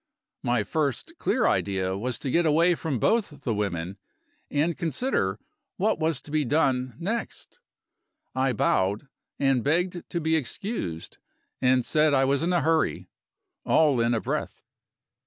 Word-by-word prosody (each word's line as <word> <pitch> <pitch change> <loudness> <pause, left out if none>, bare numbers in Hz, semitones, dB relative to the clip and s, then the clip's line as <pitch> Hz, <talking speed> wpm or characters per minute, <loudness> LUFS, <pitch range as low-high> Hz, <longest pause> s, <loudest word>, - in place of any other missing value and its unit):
My 120 -3 +1
first 140 +4 -2
clear - - +1
idea 95 -1 +1
was 120 +5 -3
to 135 - -4
get 170 +2 +3
away 165 +4 +4
from 160 -5 -2
both 160 - 0
the 120 - 0
women, 100 -2 -3 0.5
and 155 +3 +1
consider 160 - -1 0.4
what 205 -2 +1
was 160 -5 0
to 145 - -11
be 155 0 +2
done 130 -3 +1
next. 225 - -4 0.7
I 130 0 +1
bowed 105 +2 +1 0.3
and 135 -4 +2
begged 175 +4 0
to 170 - -2
be 160 0 +1
excused 150 - -4 0.4
and 130 -1 +3
said 150 -1 +3
I 135 0 +4
was 140 +1 +1
in 170 +2 +1
a 175 - +2
hurry, 160 0 +1 0.5
all 145 -6 +3
in 115 +1 +2
a - - +1
breath. - - -3
140 Hz, 150 wpm, -26 LUFS, 120-165 Hz, 0.7 s, away